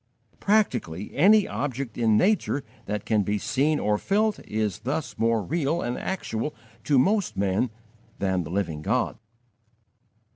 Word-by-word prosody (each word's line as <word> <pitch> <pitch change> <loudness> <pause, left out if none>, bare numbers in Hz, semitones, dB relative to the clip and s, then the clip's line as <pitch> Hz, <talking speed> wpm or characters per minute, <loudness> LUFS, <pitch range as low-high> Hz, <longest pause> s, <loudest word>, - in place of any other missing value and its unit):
Practically, 120 - 0
any 205 +7 +6
object 135 -4 -3
in 110 -3 +3
nature 185 - +2 0.2
that 105 0 -3
can 110 -2 +2
be 105 +1 0
seen 145 +8 +1
or 105 0 +1
felt 210 +2 +1
is 105 -3 -1
thus 150 +5 -3
more 115 -1 +2
real 160 - 0
and 120 +1 -2
actual 150 -7 -3 0.3
to 145 - +3
most 200 +9 +2
men 100 +5 +1 0.5
than 95 -2 0
the 80 - -8
Living 85 -5 -2
God. - - 0
120 Hz, 140 wpm, -26 LUFS, 105-160 Hz, 0.5 s, any